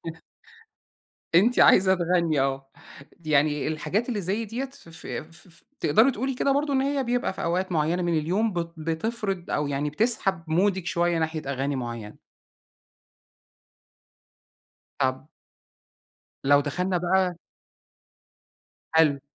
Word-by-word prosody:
ع - - -20 1.2
أنتِ 220 +8 +4
عايزة 190 0 +6
تغني 170 -4 +1
آه، 135 0 -2 0.5
يعني 150 -1 +2
الحاجات 155 - -2
اللي 225 -5 -1
زي 200 +5 -2
ديّة 230 +5 -4
ف 270 -9 -13
ف 160 -1 -11
ف 165 - -8
ف 165 - -17 0.2
تقدري 215 - +4
تقولي 265 +2 -3
كده 275 +2 +1
برضه 285 +1 0
إن 265 - +3
هي 275 0 0
بيبقى 245 -2 0
في - - -7
أوقات 180 +2 -1
معيّنة 165 +3 +1
من 170 -2 +1
اليوم 195 +8 0
بت 170 -2 -3
بتفرِض 180 +4 -3
أو 150 - 0
يعني 145 +1 -2
بتسحب 195 -1 0
مُودِك 185 +2 +1
شويّة 175 -1 +1
ناحية 160 -1 -2
أغاني 140 +1 -2
معيّنة. 115 -4 -6 2.8
طَب 130 +2 -1 1.2
لو 145 +1 +5
دخلنا 180 +6 -1
بقى 180 0 +1 1.6
حلو، 155 -4 +4
170 Hz, 125 wpm, -25 LUFS, 150-200 Hz, 2.8 s, عايزة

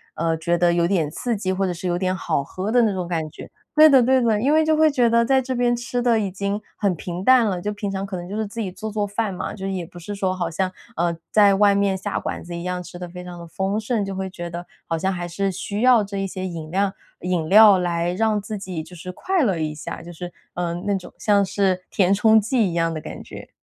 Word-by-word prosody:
呃， 165 0 0
觉 170 +2 0
得 175 0 +3
有 170 0 +2
点 170 -5 +1
刺 230 +7 -2
激， 190 -2 -1
或 195 +1 0
者 180 - -1
是 180 +2 -5
有 175 - 0
点 185 0 0
好 165 -6 -1
喝 185 +8 -5
的 245 +2 +4
那 220 - +3
种 185 -2 -3
感 165 -3 -2
觉。 - - -11 0.2
对 310 0 +8
的 265 -4 +6
对 260 +1 +4
的， 225 -3 +2
因 280 +5 +3
为 315 - +5
就 315 - +3
会 310 0 +4
觉 245 -4 +3
得 235 0 +3
在 265 +1 +3
这 260 0 -3
边 240 0 +2
吃 240 +1 -2
的 235 -2 +3
已 200 -2 -1
经 200 +2 -3 0.2
很 200 -3 +1
平 175 +2 -6
淡 255 +1 +6
了， 190 -4 -1
就 210 +3 -2
平 205 -1 -4
常 195 0 -3
可 195 -1 -6
能 175 0 -7
就 200 - -5
是 220 0 -1
自 225 +3 -8
己 205 - -2
做 215 +4 -6
做 210 -1 -1
饭 205 -1 -2
嘛， 180 - -4
就 195 -1 -6
也 190 -2 -2
不 175 +1 -14
是 175 +4 -6
说 190 -2 -1
好 175 -2 -2
像， 185 +3 0 0.3
嗯， 170 -1 0
在 205 -2 +6
外 205 0 +5
面 200 -1 +2
下 190 - -3
馆 - - -5
子 175 - -8
一 170 - -5
样 180 0 -3
吃 175 0 -10
得 180 - -5
非 180 +1 -9
常 175 -1 -9
地 170 - -9
丰 190 +5 -2
盛， 220 -1 -1
就 195 - -4
会 190 0 -3
觉 175 -2 -7
得 175 +1 -7 0.2
好 165 - -2
像 190 +4 0
还 175 -2 -4
是 195 +3 -1
需 200 +3 -4
要 245 -3 +6
这 200 0 -6
一 195 0 -1
些 185 0 -5
饮料 185 +3 -2 0.3
饮 175 -3 -1
料 210 -1 +8
来 175 -1 -1
让 215 +2 +1
自 210 0 -6
己 180 -5 -5
就 180 - -13
是 180 +2 -7
快 375 - -1
乐 200 - +2
一 155 -1 -2
下， 155 +2 -7
就 175 +1 -10
是， 175 +1 -7 0.2
嗯， 175 0 -3
那 205 -1 +1
种 185 -2 -6
像 205 -1 +3
是 190 -1 0
填 190 -1 +2
充 220 +2 +5
剂 220 -1 +1
一 - - -5
样 165 -1 0
的 155 - -5
感 - - -8
觉。 - - -11
190 Hz, 300 characters per minute, -22 LUFS, 175-215 Hz, 0.3 s, 对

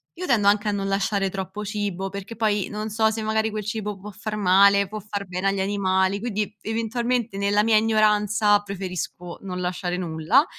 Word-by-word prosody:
Io 365 - -5
tendo 215 -5 +3
anche 205 +1 +2
a 210 - +2
non 195 -1 -2
lasciare 195 0 0
troppo 190 +2 -5
cibo, 200 -2 -3
perché 200 +3 -7
poi 210 -3 +1
non 215 +1 -4
so 220 +1 +2
se 220 0 -3
magari 220 0 +1
quel 215 0 -4
cibo 210 -1 -3
può 205 +2 -9
far 210 +2 -5
male, 200 0 +5
può 215 +1 -5
far 205 0 -5
bene 185 +2 -2
agli 195 0 +1
animali, 190 0 +1
quindi, 210 -2 -2
eventualmente 230 0 -1
nella 200 +1 +2
mia 220 -1 +4
ignoranza 210 -1 +3
preferisco 180 -3 -6
non 180 -1 -4
lasciare 180 0 -2
nulla, 175 - +2
205 Hz, 185 wpm, -24 LUFS, 195-215 Hz, -, male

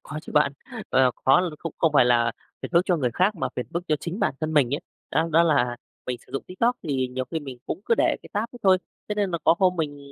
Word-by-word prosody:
Có 150 - -6
chứ - - -10
bạn. 150 -2 +3 0.4
Ờ, 130 -1 +4
có 135 +5 +6
l 175 -4 -3
cũng 165 - -5
không 165 -2 +2
phải 140 - +6
là 120 -1 +3 0.3
phiền - - -5
phức 170 0 +5
cho 180 -3 +3
người 125 -5 0
khác 185 - +2
mà - - -1
phiền 125 - -3
phức 170 - -1
cho 155 - +3
chính 170 +6 -5
bản - - +1
thân 155 0 -2
mình 140 -3 +3
ấy. - - -3 0.3
Đó, 165 +1 +1
đó 165 +2 +6
là 125 -7 +2 0.3
mình 125 -1 -3
sử - - -19
dụng 135 - -2
TikTok 235 +7 0
thì 135 -5 -1
nhiều 130 +1 -3
khi 160 - -2
mình 135 -4 -8
cũng - - -4
cứ 230 - +4
để - - +2
cái - - -13
tab 205 +1 0
đó - - -10
thôi, 190 -2 +5 0.3
thế 210 - -1
nên 205 -2 0
mà 170 - -1
có - - +6
hôm 185 -2 +3
mình 150 -3 -2
155 Hz, 285 wpm, -25 LUFS, 130-180 Hz, 0.4 s, có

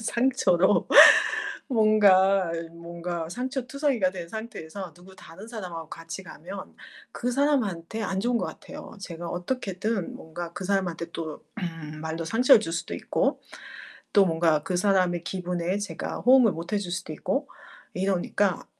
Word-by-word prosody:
상처로. 225 -7 +2 0.8
뭔가 195 - +4 0.2
뭔가 170 0 -5
상처투성이가 255 - -1
된 175 -3 -7
상태에서 195 -5 -7
누구 185 +2 -16
다른 190 +4 -12
사람하고 180 -8 -7
같이 165 +4 -8
가면 190 +2 -10 0.4
그 245 +1 -2
사람한테 225 - 0
안 195 -2 -1
좋은 240 +3 +1
것 - - -2
같아요. 300 +2 -10
제가 170 -2 -7
어떻게든 195 0 -3
뭔가 170 +1 -7
그 190 - -6
사람한테 180 -3 -1
또 160 -2 -6 0.2
음 165 -5 -6
말로 160 +1 -4
상처를 230 - +5
줄 165 -6 -4
수도 165 - -3
있고 - - -1 0.7
또 200 -2 +7
뭔가 165 -2 +2
그 180 +3 -2
사람의 180 -3 +2
기분에 180 0 -2
제가 205 0 -5
호응을 250 -3 +6
못 170 +4 -7
해 210 - +2
줄 190 -3 -5
수도 175 -3 -4
있고 275 - -2 0.5
이러니까 190 0 0
185 Hz, 295 characters per minute, -26 LUFS, 170-220 Hz, 0.8 s, 또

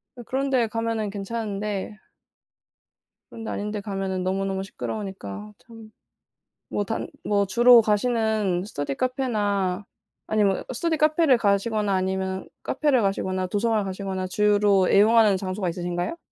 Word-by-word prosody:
아 245 - -9
그런데 265 -2 +1
가면은 225 -1 -2
괜찮은데 205 0 -4 1.3
그런 225 - -9
데 - - -5
아닌 210 +1 -3
데 210 -1 -4
가면은 195 -2 -3
너무너무 190 +1 -1
시끄러우니까 190 - -6
참. 225 -2 -14 0.8
뭐 205 - -1
단 225 +3 -3 0.2
뭐 200 -1 +2
주로 240 +4 +7
가시는 215 -4 +1
스터디 145 -8 -4
카페나 205 -7 -1 0.4
아니면은 205 -3 +1
스터디 320 +4 -1
카페를 305 -4 +4
가시거나 205 -1 +1
아니면 190 0 -2 0.2
카페를 280 -3 +1
가시거나 190 -1 -1
도서관을 210 +2 0
가시거나 190 -1 -4
주로 205 -1 +3
애용하는 215 0 +5
장소가 185 0 -3
있으신가요? 175 - -3
205 Hz, 335 characters per minute, -24 LUFS, 190-225 Hz, 1.3 s, 주로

